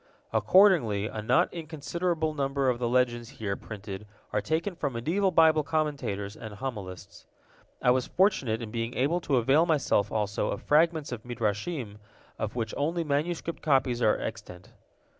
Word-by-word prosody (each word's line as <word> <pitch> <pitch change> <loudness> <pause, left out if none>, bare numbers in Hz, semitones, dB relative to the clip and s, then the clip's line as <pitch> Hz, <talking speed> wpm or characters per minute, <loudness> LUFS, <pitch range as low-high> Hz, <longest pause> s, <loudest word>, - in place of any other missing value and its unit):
Accordingly, 160 - +4
a 110 -1 -4
not 165 +11 +2
inconsiderable 160 0 -2
number 135 -2 0
of 120 - -4
the 120 -1 0
legends 120 -1 +1
here 100 -3 -2
printed 105 -1 -8 0.3
are 105 - +1
taken 165 - -1
from 145 -5 -2
medieval 170 +12 +1
Bible 160 -3 +5
commentators 140 -10 -2
and 110 -3 -9
homilists. 105 -7 -7 0.6
I 125 - +5
was 125 0 +1
fortunate 140 - +1
in 110 - -7
being 115 +1 -3
able 155 +7 +1
to 145 - 0
avail 135 +7 +4
myself 140 - +2
also 105 -2 -1
of - - -4
fragments 160 -1 +2
of 120 -3 -5
Midrashim 115 - -3 0.4
of 110 +1 -3
which 110 -3 -2
only 165 +4 0
manuscript 160 +3 -2
copies 130 -5 +2
are 110 - +3
extant. 105 -5 -7
130 Hz, 155 wpm, -28 LUFS, 110-160 Hz, 0.6 s, Bible